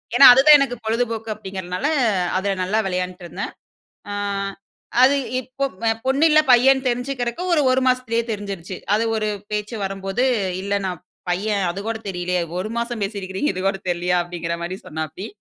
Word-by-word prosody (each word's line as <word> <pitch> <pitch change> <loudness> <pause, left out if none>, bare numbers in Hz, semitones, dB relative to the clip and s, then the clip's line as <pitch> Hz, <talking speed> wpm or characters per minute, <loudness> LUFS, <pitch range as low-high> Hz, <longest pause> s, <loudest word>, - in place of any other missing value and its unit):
ஏன்னா, 275 - +9
அது 260 - +7
தான் 300 -1 +10
எனக்கு 265 -3 0
பொழுதுபோக்கு 225 0 -1
அப்டிங்கிறனால 190 +3 -4 0.5
அதுல 200 +1 0
நல்லா 205 +4 +1
விளையாண்ட்டு 180 0 -3
இருந்தேன். 170 - -5 0.6
ஆ - - -3 0.9
அது 270 +2 +6 0.2
இப்போ 260 +2 -4 0.2
அ - - +4 0.2
பொண்ணு 275 +4 +3
இல்ல. 305 0 +6
பையன்னு 265 +2 +5
தெரிஞ்சுக்கிறக்கு, 245 +3 -2 0.3
1 260 - +2
மாசத்திலியே 250 -2 +1
தெரிஞ்சிருச்சு. 195 -4 -5 0.2
அது 220 +2 +2
ஒரு 215 -1 -1 0.2
பேச்சு 210 +2 -3
வரும்போது, 195 +5 -2 0.4
"இல்ல 200 0 0
நான் 180 -2 -5 0.3
பையன். 200 +2 0
அது 190 +3 -5
கூட 225 -1 -2
தெரிலயா? 180 -1 -1 0.2
ஒரு 215 - -3
மாசம் 235 -2 -3
பேசியிருக்கிறீங்க. 195 +4 -2
இது 185 - -4
கூட 195 - -2
தெரிலயா?" 175 +1 0
அப்படிங்கிற 170 -1 -4
மாரி 185 +2 -4
சொன்னாப்டி 160 +5 -5
210 Hz, 155 wpm, -21 LUFS, 185-245 Hz, 0.9 s, தான்